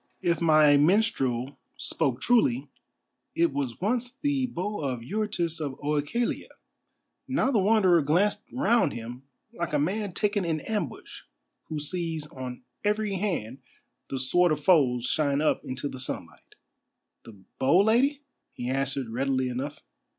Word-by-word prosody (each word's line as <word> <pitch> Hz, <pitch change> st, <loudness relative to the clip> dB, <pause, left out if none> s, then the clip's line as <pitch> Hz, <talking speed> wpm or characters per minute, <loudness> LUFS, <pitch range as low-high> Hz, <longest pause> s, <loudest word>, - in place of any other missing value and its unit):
If 170 Hz, -3 st, +1 dB
my 155 Hz, -3 st, +6 dB
minstrel 145 Hz, -, +1 dB, 0.2 s
spoke 135 Hz, -6 st, -1 dB
truly, 140 Hz, -, +2 dB, 0.6 s
it 170 Hz, -3 st, +2 dB
was 135 Hz, -4 st, -3 dB
once 245 Hz, +5 st, -1 dB
the 280 Hz, -3 st, +1 dB
Bow 205 Hz, -2 st, -4 dB
of 130 Hz, -5 st, -3 dB
Eurytus 175 Hz, -, -2 dB
of 145 Hz, -4 st, -3 dB
OEchalia." 150 Hz, +11 st, -1 dB, 0.8 s
Now 265 Hz, 0 st, +1 dB
the 230 Hz, -, +3 dB
Wanderer 190 Hz, -4 st, +4 dB
glanced 195 Hz, +9 st, +1 dB
round 240 Hz, -, +2 dB
him 120 Hz, +2 st, -7 dB, 0.3 s
like 170 Hz, -8 st, -4 dB
a -, -, +3 dB
man 195 Hz, +5 st, -1 dB
taken 205 Hz, +1 st, 0 dB
in 165 Hz, -2 st, -1 dB
ambush, 215 Hz, -2 st, -4 dB, 0.4 s
who 155 Hz, -, -5 dB
sees 160 Hz, 0 st, -3 dB
on 130 Hz, -3 st, -8 dB, 0.2 s
every 210 Hz, -1 st, 0 dB
hand 140 Hz, -, -2 dB, 0.5 s
the 135 Hz, -, -3 dB
sword 175 Hz, +7 st, +3 dB
of 150 Hz, -1 st, -1 dB
foes 130 Hz, -9 st, +4 dB
shine 140 Hz, 0 st, +1 dB
up 155 Hz, -, +2 dB
into 130 Hz, +2 st, -4 dB
the 130 Hz, -, -7 dB
sunlight. 130 Hz, -, -6 dB, 0.7 s
"The 110 Hz, -4 st, -13 dB, 0.2 s
bow, 140 Hz, +8 st, +5 dB
Lady?" 270 Hz, +7 st, +2 dB, 0.3 s
he 125 Hz, +1 st, -4 dB
answered 135 Hz, -1 st, -1 dB
readily 130 Hz, +2 st, 0 dB
enough. 135 Hz, +4 st, -5 dB
155 Hz, 140 wpm, -27 LUFS, 135-210 Hz, 0.8 s, my